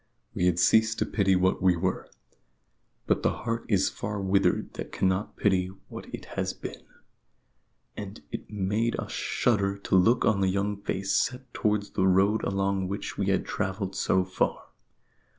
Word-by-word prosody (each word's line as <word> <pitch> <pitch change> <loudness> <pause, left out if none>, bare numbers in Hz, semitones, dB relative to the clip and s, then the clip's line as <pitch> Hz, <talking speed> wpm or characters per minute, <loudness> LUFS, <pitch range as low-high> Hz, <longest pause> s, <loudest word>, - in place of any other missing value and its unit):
We 90 - +1
had 90 -1 +2
ceased 110 +4 +4
to - - +1
pity 95 -3 +2
what 95 +1 +2
we 90 -2 +4
were, 90 +2 -2 1.0
but - - +1
the - - +2
heart 115 0 -2
is 100 -3 +3
far 105 0 -4
withered 95 0 +1
that - - -6
cannot 95 +2 0
pity 95 -3 +2 0.2
what - - -8
it - - -7
has - - -1
been; - - -8 1.1
and 100 +1 -7
it - - -6
made 105 +3 -1
us - - -5
shudder 100 -4 0
to 100 - -1
look 115 +7 +4
on 105 -3 +2
the 95 - +3
young 100 +1 -1
face 95 0 -1
set 130 +1 -1
towards 105 -2 0
the 95 - +1
road 100 +4 +3
along 95 -1 0
which 100 +2 -4
we 100 - 0
had 95 -1 +1
travelled 95 -1 -3
so 95 -1 +2
far. 90 0 -2
100 Hz, 170 wpm, -27 LUFS, 95-105 Hz, 1.1 s, ceased